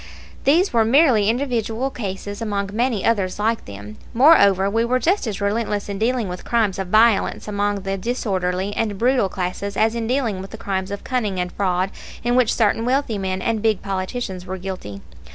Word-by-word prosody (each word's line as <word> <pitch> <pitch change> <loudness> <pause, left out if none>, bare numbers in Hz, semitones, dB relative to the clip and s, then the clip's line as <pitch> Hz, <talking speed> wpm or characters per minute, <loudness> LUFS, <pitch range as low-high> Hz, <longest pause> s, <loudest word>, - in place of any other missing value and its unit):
These 335 +6 +3
were 230 -1 +4
merely 230 -4 +4
individual 240 0 -1
cases 205 -2 -5
among 200 -3 -2
many 235 -2 0
others 200 -5 +1
like 220 +2 0
them. 105 +1 -10 0.2
Moreover, 200 - +6
we 225 +3 +1
were 245 +2 +1
just 345 - +1
as 205 -3 -3
relentless 205 0 -1
in 200 -1 -4
dealing 235 -1 0
with 180 0 -6
crimes 220 -5 0
of 190 - -3
violence 215 +2 +3
among 205 -1 -1
the 195 0 -3
disorderly 190 -4 -2
and 210 -3 -1
brutal 245 -2 +2
classes 190 +2 -4
as 220 +1 +3
in 230 -1 -3
dealing 235 -7 -1
with 195 - -8
the - - -9
crimes 190 -1 -3
of 200 0 -6
cunning 215 -8 -1
and 180 0 -2
fraud 185 -1 0 0.3
of 240 - +2
which 250 -3 +3
certain 225 0 +1
wealthy 250 -3 0
men 190 -1 -2
and 225 -2 0
big 220 -3 +1
politicians 190 0 -4
were 190 +1 -5
guilty. 180 - -7
205 Hz, 190 wpm, -21 LUFS, 190-235 Hz, 0.3 s, Moreover